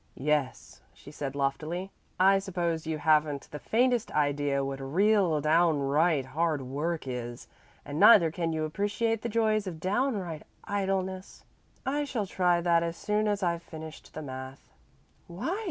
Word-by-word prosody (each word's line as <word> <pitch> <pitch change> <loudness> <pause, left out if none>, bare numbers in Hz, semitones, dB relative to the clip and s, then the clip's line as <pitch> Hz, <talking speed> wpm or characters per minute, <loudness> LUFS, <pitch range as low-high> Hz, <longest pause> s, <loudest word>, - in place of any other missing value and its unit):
"Yes," 145 -1 -2
she - - -13
said 140 -2 -5
loftily. 155 +7 -2 0.3
"I 195 +1 +5
suppose 170 -4 -2
you 160 -1 -1
haven't 150 -2 +2
the 150 - -6
faintest 245 - +1
idea 145 -2 +1
what 135 0 -4
real, 180 +3 +2
downright 155 -1 +2
hard 155 +1 -1
work 150 +6 -3
is, 120 -1 -5 0.4
and 145 +2 -4
neither 175 -7 +7
can 165 0 -2
you 160 -1 -1
appreciate 205 +6 -1
the 235 - -3
joys 215 -2 +1
of 165 -4 -6
downright 190 - -1 0.2
idleness. 190 -1 -3 0.4
I 290 +3 0
shall 235 -7 -2
try 180 -2 +1
that 170 -1 +3
as 170 0 -3
soon 210 +2 0
as 205 -1 0
I've 170 -1 0
finished 160 -2 -10
the 155 - -5
math." 130 0 -9 0.5
"Why?" 310 - -3
170 Hz, 150 wpm, -29 LUFS, 150-195 Hz, 0.5 s, neither